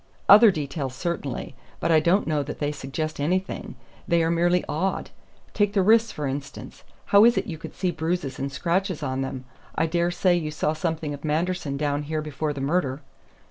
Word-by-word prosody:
"Other 210 +3 +9
details, 140 -5 -3
certainly; 170 -6 -4 0.3
but - - 0
I 160 - +6
don't 175 +6 +2
know 155 -2 0
that 145 - -6
they 145 0 -1
suggest 150 +2 -4
anything. 180 +3 -2 0.3
They 170 -1 +3
are 165 - +1
merely 175 +1 +2
odd. 185 +6 -2 0.4
Take 205 -1 +1
the 195 -3 +3
wrists, 225 +2 +4
for 150 - -4
instance. 135 +1 -6 0.2
How 200 +1 +6
is 235 +1 +5
it - - 0
you 165 -7 -6
could - - -9
see 185 -1 0
bruises 160 -4 -3
and 140 +1 -3
scratches 175 +3 -1
on 130 -1 -2
them? 130 -1 -5 0.3
I 160 - +2
dare 170 +1 +1
say 175 0 +2
you 160 -3 -2
saw 150 0 -1
something 160 -2 -3
of 145 - -9
Manderson 160 -1 -1
down 145 0 0
here 155 +1 -3
before 150 0 -3
the 140 -2 -5
murder?" 140 -2 -1
160 Hz, 195 wpm, -25 LUFS, 145-180 Hz, 0.4 s, Other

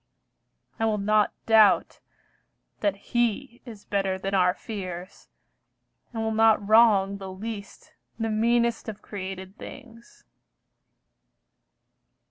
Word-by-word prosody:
I 225 - +1
will 215 -1 +1
not 210 +1 +2
doubt 215 -6 +4 0.8
that 205 -2 0
He 240 +4 -2
Is 220 -5 -11
better 195 -2 -1
than 195 +1 -4
our 180 -1 +3
fears, 185 -4 -7 0.8
and 225 -2 -3
will 220 - -1
not 220 -2 +3
wrong 205 -3 +5
The 190 -1 -7
least, 205 +1 -8 0.2
the 225 - -2
meanest 235 +1 +1
of 210 - -9
created 190 0 -7
things. 235 -4 -13
210 Hz, 105 wpm, -26 LUFS, 195-225 Hz, 0.8 s, wrong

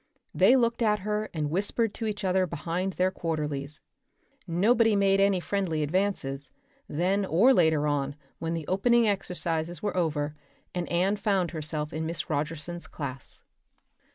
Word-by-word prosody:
They 260 - +5
looked 235 -2 +1
at 210 -3 +2
her 210 +1 -2
and 150 -3 -2
whispered 205 +5 +1
to 225 - -3
each 210 -1 -4
other 185 0 +2
behind 175 +5 -3
their 185 +1 +1
quarterlies. 150 -5 -3 0.7
Nobody 220 +6 +3
made 195 -1 +3
any 195 -1 +3
friendly 175 -5 -1
advances, 150 -5 -1 0.4
then 185 +6 +1
or 195 +9 +4
later 160 - +3
on 145 -1 -1 0.2
when 165 +1 -2
the 165 -2 -4
opening 235 +4 +3
exercises 175 -4 -1
were 205 -3 -1
over 150 -4 0 0.4
and 175 -1 -3
Anne 185 +4 +2
found 195 -5 0
herself 155 -1 -4
in 160 0 -2
Miss 165 -1 -3
Rogerson's 155 +3 -3
class. 135 -3 -7
175 Hz, 150 wpm, -27 LUFS, 155-200 Hz, 0.7 s, They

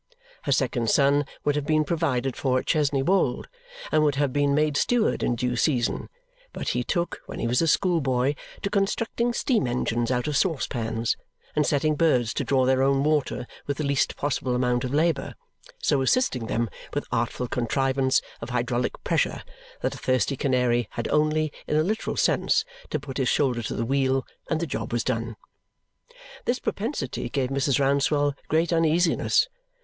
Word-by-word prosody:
Her 140 - 0
second 125 -4 +1
son 140 +3 +4 0.2
would 145 - +2
have 150 -1 -2
been 155 -1 +3
provided 140 -6 -1
for 130 -2 +1
at - - -2
Chesney 145 -4 +1
Wold 175 -7 +1 0.4
and 155 - +4
would 145 -2 +2
have 140 -2 0
been 145 -1 +2
made 150 -1 +2
steward 235 +9 +2
in 120 - +1
due 125 +1 -1
season, 125 -2 0 0.4
but - - -3
he - - 0
took, 175 -1 -2
when - - -7
he - - -2
was 120 +4 +2
a 165 - +2
schoolboy, 145 -7 +2 0.3
to 200 - -1
constructing 225 +4 0
steam 235 - +1
engines 120 -1 -1
out 125 -1 0
of 150 - -1
saucepans 115 -8 0 0.4
and 150 -1 +2
setting 155 +1 +2
birds 140 -7 +2
to - - -1
draw 130 -2 +2
their 130 0 +3
own 135 0 +3
water 150 -4 0 0.2
with 140 - -2
the 155 - -2
least 140 -1 +1
possible 135 -3 -1
amount 125 -1 +1
of 125 - -3
labour, 155 -1 +1 0.5
so 140 - +2
assisting 130 - +1
them 115 +1 0 0.3
with - - -1
artful 125 - -1
contrivance 130 +2 +1 0.2
of 115 - -6
hydraulic 120 0 -1
pressure - - 0 0.4
that - - -1
a - - -9
thirsty 130 +1 +1
canary 125 -4 +1
had 120 - -3
only, 155 0 +1
in - - 0
a 155 - +4
literal 215 +6 -2
sense, - - +2 0.2
to - - -1
put 135 -2 -7
his 130 -3 +1
shoulder 125 -5 +1
to 110 - -4
the 115 - -1
wheel 135 0 +1 0.2
and 160 - 0
the 170 - -1
job 115 -6 -4
was 120 -1 0
done. 115 -2 -2 1.1
This 245 - +1
propensity 200 - -3
gave 130 0 -1
Mrs. 140 0 +1
Rouncewell 140 +1 +2
great 165 +2 +1
uneasiness. 165 - +3
140 Hz, 175 wpm, -25 LUFS, 125-155 Hz, 1.1 s, son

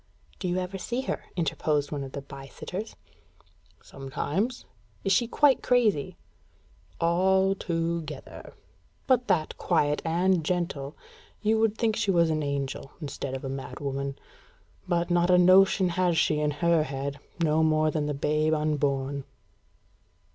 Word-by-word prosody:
"Do 185 - -3
you 175 +1 0
ever 185 +1 -3
see 245 +7 -2
her?" 265 - -4
interposed 150 -3 0
one 145 -2 -3
of 135 - -8
the 140 - -5
by 135 0 -10
sitters. 195 +9 -7 0.9
"Sometimes." 155 - -3 0.4
"Is 195 - 0
she 230 +5 +3
quite 275 +1 +3
crazy?" 220 - +1 0.8
"Al 190 +3 +3
to 170 0 -1
gether; 150 -3 -10 0.5
but 255 -2 +2
that 175 -6 +1
quiet 145 0 +1
and 175 +1 +2
gentle, 155 -4 -2 0.5
you 220 +1 +3
would 220 -1 +2
think 225 -2 +1
she 210 - -1
was 170 -3 +3
an 155 0 0
angel 140 -2 -3
instead 140 -3 -5
of 135 - -6
a - - -2
mad 135 0 -6
woman. 140 -1 -3 0.7
But 175 -1 0
not 175 0 +3
a 180 - +6
notion 185 +1 +5
has 175 -1 +1
she 155 -1 +2
in 150 0 +1
her 165 +2 +2
head, 140 -1 -4 0.2
no 160 -1 +2
more 155 -1 +3
than 150 -2 -1
the 150 - -2
babe 155 +2 +1
unborn." 145 -2 -1
160 Hz, 150 wpm, -27 LUFS, 145-185 Hz, 0.9 s, a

